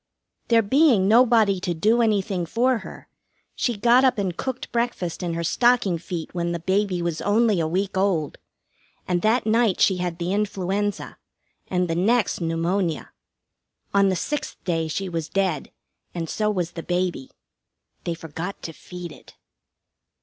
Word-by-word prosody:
There 230 -1 +4
being 250 -4 +4
nobody 220 -3 +4
to 180 -2 -2
do 220 +8 +3
anything 195 -5 0
for 245 +5 +1
her, - - -11 0.5
she 240 -4 -1
got 240 +4 +5
up 260 -3 +3
and 190 -4 -1
cooked 260 +5 -5
breakfast 235 -8 -2
in 170 -2 -2
her 170 - -2
stocking 225 -2 +2
feet 170 -2 -6
when 170 -1 -1
the 170 - -3
baby 190 0 0
was 170 -2 -2
only 210 -1 +2
a 160 - 0
week 190 +4 -1
old, 185 -6 0 0.7
and 175 -1 0
that 225 +2 +2
night 220 -3 +2
she 190 - +4
had 180 -2 -3
the 175 +2 -2
influenza, 205 0 -2 0.5
and 180 -1 0
the 165 - -1
next 205 +4 +1
pneumonia. 165 +1 -1 0.8
On 200 -1 +4
the 190 - +1
sixth 295 +10 -3
day 165 -3 -1
she 190 +5 -3
was 165 -3 -4
dead, 185 -6 -1 0.5
and 165 -2 -3
so 210 +5 -1
was 180 -5 -1
the 165 - -6
baby. 175 -6 -2 0.7
They 170 - -2
forgot 165 +4 -6
to 165 - -6
feed 180 +1 -9
it. - - -16
190 Hz, 160 wpm, -24 LUFS, 170-215 Hz, 0.8 s, got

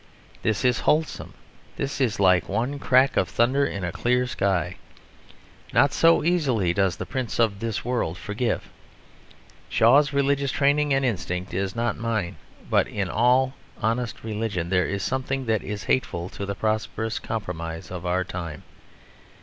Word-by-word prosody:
This 110 +3 0
is 125 -1 +3
wholesome; 155 +1 0 0.4
this 140 0 -3
is 115 -6 +1
like 90 -3 +4
one 120 +8 -1
crack 130 0 +3
of - - +2
thunder 135 +4 +2
in 100 - -5
a 90 - -2
clear 125 +5 +1
sky. 95 -7 -1 1.0
Not 140 - +4
so 165 0 +4
easily 135 - +2
does 95 -3 +1
the - - -5
prince 130 -4 -3
of 110 -4 +2
this 115 -1 -3
world 120 -9 -1
forgive. 110 +5 -2 1.0
Shaw's 140 +6 +5
religious 140 -1 +1
training 145 +2 +2
and 135 0 +2
instinct 90 -5 -2
is 95 +1 -2
not 120 -2 -1
mine, 110 -6 -2 0.3
but - - +2
in 100 -2 -3
all 125 +3 +3 0.3
honest 115 0 -1
religion 105 -6 -2
there 90 -1 +2
is 100 0 -2
something 130 0 -2
that 110 -2 +1
is 105 0 -5
hateful 90 -9 -1
to 100 0 -6
the 100 - -3
prosperous 110 +1 -1
compromise 85 -7 -5
of 90 -2 -6
our 90 +1 0
time. 85 -4 -6
110 Hz, 155 wpm, -25 LUFS, 95-130 Hz, 1.0 s, Shaw's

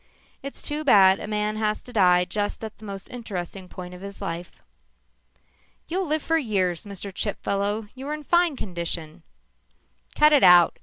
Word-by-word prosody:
"It's 275 +1 -7
too 300 +1 -3
bad 195 -8 +6
a - - -6
man 210 0 -1
has 215 -1 -1
to 245 - -12
die 180 -4 +4
just 205 +3 -3
at 220 -1 -7
the 220 - -11
most 195 -1 -7
interesting 195 -6 -6
point 180 -1 -8
of 180 - -11
his 200 0 -8
life." 170 +1 -6 1.2
"You'll 370 +3 -2
live 310 0 0
for 325 0 +2
years, 190 - -1
Mr. 200 -1 -7
Chipfellow. 205 +1 -2
You're 275 +3 -5
in 305 - -9
fine 345 0 +2
condition." 170 -5 -4 0.9
"Cut 300 0 +6
it 290 - +5
out. 180 -2 +7
205 Hz, 165 wpm, -25 LUFS, 185-255 Hz, 1.2 s, out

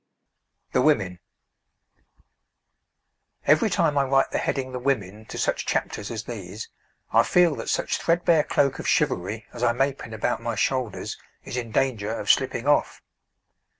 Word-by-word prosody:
THE 125 - +2
WOMEN 105 -12 +2 2.3
Every 155 +9 +4
time 165 -6 +2
I - - +3
write 135 0 +2
the - - 0
heading 130 -2 -2
'The 125 - -4
Women' 110 -6 -2
to - - -7
such - - -1
chapters 105 - -2
as 110 -2 -4
these, 105 -2 -7 0.4
I 115 - +7
feel 175 +5 +4
that - - -5
such - - 0
threadbare 170 -2 +3
cloak 140 -2 +1
of - - -4
chivalry 105 +5 0
as 120 - -8
I 120 -1 +3
may 135 +3 +1
pin 120 -3 -10
about 110 +2 -1
my 115 -1 -2
shoulders 130 -5 -2 0.2
is - - -6
in 120 -2 -3
danger 115 -3 0
of - - +4
slipping 130 -2 0
off. 145 - +2
125 Hz, 155 wpm, -25 LUFS, 110-140 Hz, 2.3 s, I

